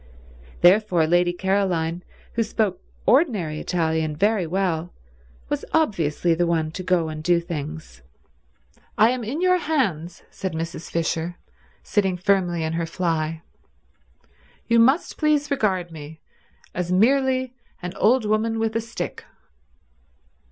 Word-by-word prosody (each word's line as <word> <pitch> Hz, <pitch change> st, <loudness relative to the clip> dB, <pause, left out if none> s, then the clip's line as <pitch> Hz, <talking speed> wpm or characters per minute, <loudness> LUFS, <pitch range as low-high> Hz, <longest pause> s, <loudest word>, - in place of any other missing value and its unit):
Therefore 180 Hz, -2 st, +5 dB
Lady 175 Hz, +2 st, +3 dB
Caroline, 180 Hz, -3 st, 0 dB, 0.3 s
who 230 Hz, -, 0 dB
spoke 210 Hz, -4 st, -1 dB, 0.2 s
ordinary 215 Hz, -, +2 dB
Italian 160 Hz, -3 st, -1 dB
very 200 Hz, +1 st, +1 dB
well, 175 Hz, -1 st, -1 dB, 0.5 s
was -, -, -2 dB
obviously 175 Hz, -, +1 dB
the 175 Hz, +1 st, +1 dB
one 160 Hz, -2 st, 0 dB
to 185 Hz, -, -6 dB
go 180 Hz, -3 st, +1 dB
and 155 Hz, -1 st, -6 dB
do 175 Hz, +1 st, +3 dB
things. 155 Hz, -, -7 dB, 1.0 s
"I 220 Hz, +3 st, +6 dB
am 250 Hz, -1 st, -3 dB
in 265 Hz, +10 st, -3 dB
your 365 Hz, 0 st, +4 dB
hands," 190 Hz, -, -1 dB
said 190 Hz, -2 st, -4 dB
Mrs. 165 Hz, +1 st, -5 dB
Fisher, 165 Hz, +1 st, -2 dB, 0.5 s
sitting 195 Hz, -4 st, 0 dB
firmly 180 Hz, -3 st, +1 dB
in 160 Hz, 0 st, -2 dB
her 165 Hz, 0 st, -2 dB
fly. 165 Hz, -2 st, -2 dB, 1.2 s
"You 230 Hz, 0 st, +3 dB
must 265 Hz, +8 st, +3 dB
please 300 Hz, -2 st, +2 dB
regard 190 Hz, -9 st, 0 dB
me 155 Hz, 0 st, -10 dB, 0.5 s
as 180 Hz, 0 st, -3 dB
merely 260 Hz, +5 st, +2 dB, 0.3 s
an 180 Hz, 0 st, -4 dB
old 235 Hz, +2 st, +3 dB
woman 215 Hz, +2 st, +1 dB
with 225 Hz, 0 st, -1 dB
a 230 Hz, -, +1 dB
stick." 230 Hz, +1 st, -6 dB
180 Hz, 130 wpm, -23 LUFS, 165-225 Hz, 1.2 s, I